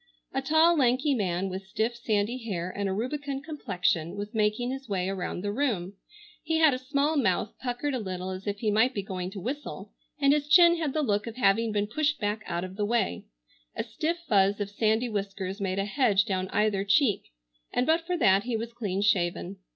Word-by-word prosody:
A 270 - 0
tall 315 +5 +4
lanky 265 +2 +3
man 190 -5 -1
with 190 +1 -6
stiff 220 +4 -1
sandy 225 +1 -1
hair 185 -5 -3
and 200 -1 -1
a - - -1
rubicund 275 +6 -3
complexion 180 - -1
was 205 +1 -6
making 220 +3 +1
his 270 -2 -7
way 185 -2 -1
around 190 -2 -3
the 205 - -1
room. 205 -7 -1 0.5
He 320 0 0
had 315 -3 +5
a 255 - -2
small 280 +4 0
mouth 210 -4 +1
puckered 255 +3 -2
a 255 - -1
little 185 -3 -4
as 185 +2 -7
if 205 0 -3
he 215 -3 +1
might 225 +5 +3
be 200 - -2
going 185 -2 -4
to 195 +1 -7
whistle, 270 +10 -5 0.3
and 280 0 +5
his 295 -1 0
chin 340 +1 +7
had 310 -5 -2
the 310 - 0
look 210 -3 0
of 225 - -6
having 225 -1 +2
been 205 -1 0
pushed 295 +7 0
back 210 +1 -1
out 170 +1 -2
of 185 +1 -7
the 210 - 0
way, 220 - 0 0.5
a - - -2
stiff 335 +2 -2
fuzz 200 -4 +3
of 200 -1 -3
sandy 220 +3 +1
whiskers 195 -2 -4
made 190 -1 -1
a 195 - 0
hedge 210 -3 +2
down 190 -3 -1
either 205 0 +1
cheek, 205 +2 +2 0.5
and 245 - +1
but 320 +3 +3
for 355 +2 -2
that 195 - +4
he 240 -2 -1
was 230 +1 -6
clean 200 -4 -2
shaven. 185 -1 0
215 Hz, 215 wpm, -28 LUFS, 195-265 Hz, 0.5 s, chin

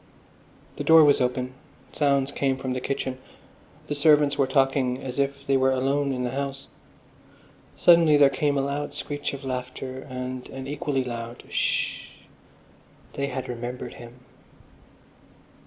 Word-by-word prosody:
The - - -3
door 160 -1 +8
was 145 -2 +4
open; 125 0 -1 0.4
sounds 140 -2 +1
came 135 -2 0
from 130 -1 -3
the 130 - -3
kitchen. 130 -1 -3 0.7
The - - -3
servants 145 -1 +4
were 140 -2 +2
talking 135 -1 +2
as 130 +1 -6
if 140 0 -1
they 135 - +2
were 130 0 +3
alone 135 +2 +1
in 125 -1 -2
the 125 - -2
house. 135 0 -4 1.1
Suddenly 165 -3 +6
there 140 -1 +6
came 145 0 0
a - - +2
loud 145 +1 -3
screech 145 -1 -4
of 135 0 -10
laughter 130 0 -5
and 130 0 -5
an 135 0 -7
equally 140 -1 -2
loud 120 -1 -6
"Sh!" - - 0 1.1
They 140 0 -2
had 130 -1 -4
remembered 125 +1 -5
him. 120 +1 -13
135 Hz, 145 wpm, -25 LUFS, 130-140 Hz, 1.1 s, door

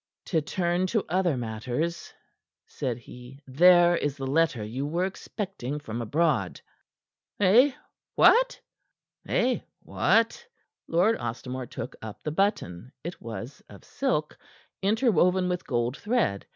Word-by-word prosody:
"To 160 -3 +1
turn 175 +3 0
to 220 +1 0
other 175 -4 +1
matters," 125 +9 -3 0.5
said 125 -4 -4
he; 125 +2 -13
"there 175 +5 +6
is 145 -3 -2
the 135 - -4
letter 145 -4 +1
you 120 +6 -4
were 170 +5 0
expecting 190 - -5
from 120 -4 -5
abroad." 135 - 0 0.8
"Eh? 230 +8 +5 0.4
What?" - - +5 0.7
Lord 240 - +1 0.8
Ostermore 125 +1 -5
took - - -6
up 110 -2 -9
the 150 - -2
button. 145 - -1
It 170 +3 -7
was 115 +3 -7
of 100 - -14
silk, 245 - -1 0.5
interwoven 190 - +3
with 180 -1 -3
gold 120 0 -1
thread. 210 - 0
155 Hz, 115 wpm, -27 LUFS, 125-185 Hz, 0.8 s, there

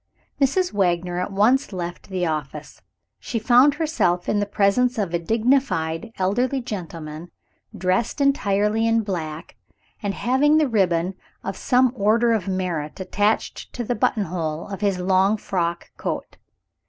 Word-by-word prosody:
Mrs. 355 +7 +2
Wagner 175 -2 0
at 180 - -3
once 225 +8 +3
left 175 -1 -6
the 185 -2 -1
office. 150 -2 -5 0.4
She 235 - -4
found 250 +5 +5
herself 235 - 0
in 210 - +1
the 205 - -1
presence 210 +5 +2
of 195 -5 -1
a 170 - +1
dignified 225 - 0
elderly 245 +8 +1
gentleman, 170 -7 -7 0.5
dressed 185 +9 0
entirely 215 -5 +2
in 230 0 +3
black, 160 -6 -5 0.4
and 205 -2 -2
having 285 +5 +3
the 310 -2 +3
ribbon 185 -5 +1 0.3
of 195 - -4
some 250 +2 +2
order 230 +2 +3
of 205 -4 -1
merit 180 -5 -3
attached 205 +3 -1
to 245 - -3
the 245 - -1
buttonhole 170 -8 -1
of 195 0 -6
his 200 -3 +1
long 190 +3 +2
frock 170 -4 -3
coat. - - -4
200 Hz, 140 wpm, -23 LUFS, 175-235 Hz, 0.5 s, found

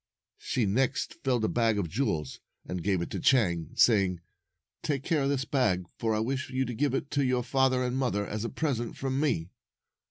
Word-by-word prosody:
She 120 - 0
next 130 +7 0
filled 125 -5 +1
a - - +2
bag 115 -2 +2
of 100 -4 0
jewels, 80 - -2 0.3
and 90 -1 -4
gave 95 -2 +1
it - - -7
to - - -3
Chang, 85 -11 +2
saying, 95 -6 +4 0.6
"Take 140 -3 -1
care 155 -1 +1
of 135 - +1
this 135 -1 0
bag, 100 -12 +1
for 110 -1 +1
I - - 0
wish 130 +5 -2
you 130 0 0
to 125 - -4
give 135 +3 0
it 135 - -3
to 140 -1 +1
your 125 -1 +1
father 130 0 +2
and 125 0 -1
mother 120 -6 0
as 105 +1 -4
a 115 - -2
present 125 -7 -2
from 135 0 -1
me." 95 - 0
125 Hz, 210 wpm, -29 LUFS, 100-135 Hz, 0.6 s, saying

